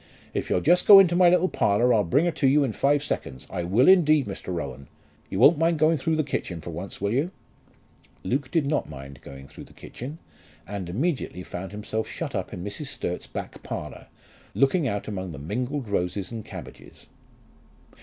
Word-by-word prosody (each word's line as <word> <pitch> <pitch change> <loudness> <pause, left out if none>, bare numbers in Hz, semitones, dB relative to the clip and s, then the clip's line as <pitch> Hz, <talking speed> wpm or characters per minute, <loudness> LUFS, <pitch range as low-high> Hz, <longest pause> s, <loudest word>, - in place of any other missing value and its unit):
If - - -3
you'll 90 - +1
just 175 +4 +3
go 205 - +11
into 180 -3 +6
my 180 -1 +6
little 180 +1 +3
parlour, 120 - +2
I'll 105 -2 +3
bring 120 - +2
her 175 - +2
to 140 - +1
you 145 +2 +4
in 125 -5 -1
five 145 +4 +2
seconds; 65 - -4
I 90 - -3
will 100 +9 +3
indeed, 155 -7 +5
Mr. 95 -2 -6
Rowan. 70 -6 -5 0.4
You - - -4
won't 145 - +6
mind 165 0 +2
going 155 +2 +4
through 160 +4 0
the 155 - +1
kitchen 95 - -4
for 85 - -7
once, 90 +4 -7
will 100 +2 -1
you?" 140 +8 +1 0.9
Luke 130 +7 -1
did 160 -2 +1
not 145 - -1
mind 70 -3 -10
going 70 0 -11
through - - -12
the - - -19
kitchen, 140 +6 -8 0.5
and 100 -3 -6
immediately 130 - -2
found 95 +1 -7
himself 105 +1 -4
shut - - -5
up - - -3
in 90 - -6
Mrs. 105 +9 -5
Sturt's 120 -9 -4
back - - -7
parlour, - - -7 0.5
looking 140 +3 +2
out 100 -4 -3
among 95 -4 -5
the - - -8
mingled 125 - -3
roses 95 0 -2
and 115 -2 -6
cabbages. - - -11 0.9
Mrs. - - -24
120 Hz, 200 wpm, -25 LUFS, 90-150 Hz, 0.9 s, go